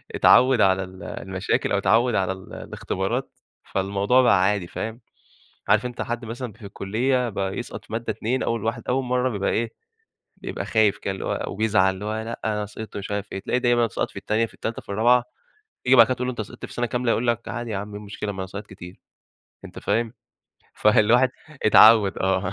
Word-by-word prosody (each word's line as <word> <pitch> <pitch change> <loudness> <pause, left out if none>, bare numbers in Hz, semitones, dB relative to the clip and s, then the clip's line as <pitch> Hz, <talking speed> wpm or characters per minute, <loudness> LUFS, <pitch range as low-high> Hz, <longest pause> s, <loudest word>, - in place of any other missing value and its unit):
اتعود 125 -3 +5
على 95 -1 +3
ال 95 0 -11
المشاكل، 95 0 -2
أو 100 - +3
اتعود 115 +4 +3
على 95 0 +1
ال 95 0 -9
الاختبارات 115 +8 -3 0.3
فالموضوع 100 +6 +1
بقى 115 -7 +4
عادي 100 -3 +1
فاهم؟ 115 +6 -6 0.7
عارف 105 +3 +4
أنت 125 -1 -5
حد 120 0 -4
مثلًا 120 0 -6
في 110 -2 -13
الكلية 120 +6 -1
بقى 95 -2 -3
يسقط 120 - -7
في 110 - -12
مادة، 115 +1 -3
2 125 +4 -1
أوّل 115 -2 -1
واحد 115 0 -2
أوّل 130 +1 +1
مرّة 125 +1 +1
بيبقى 100 -4 -1
إيه، 115 0 -1 0.6
بيبقى - - -5
خايف 110 -3 +2
كده 95 - -3
اللي 95 - -6
هو - - -2
وبيزعل 100 -2 +2
اللي 105 +2 -7
هو 110 +1 -2
لأ 115 +1 -6
أنا 105 -1 -1
سقطت 110 +2 -9
ومش 100 0 -5
عارف 100 0 -3
إيه، 95 - -3
تلاقي 125 +5 -1
دايمًا 120 -1 +3
سقط - - -3
في - - -24
التانية 110 +2 0
في - - -14
التالتة 115 - -5
في - - -26
الرابعة 120 +4 +4 0.6
تيجي 130 +1 +5
بعد 115 -2 +9
كده 130 - 0
تقول 125 +1 -3
له - - 0
أنت 115 - -4
سقطت 120 +3 -8
في - - -12
سنة 120 - -1
كاملة؟ 120 -1 0
يقول 120 +1 0
لَك 115 0 0
عادي 120 -1 -4
يا 100 - -2
عم 105 +1 -5
إيه 105 - -6
المشكلة 105 0 -5
ما 95 - -8
أنا 95 - -3
ساقط 105 +2 -7
كتير، 90 -1 -12 0.7
أنت - - -10
فاهم؟ 115 0 -1 0.6
فالواحد 110 +4 +4 0.4
اتعود 110 -2 +7
آه 95 0 0
110 Hz, 210 wpm, -24 LUFS, 100-120 Hz, 0.7 s, بعد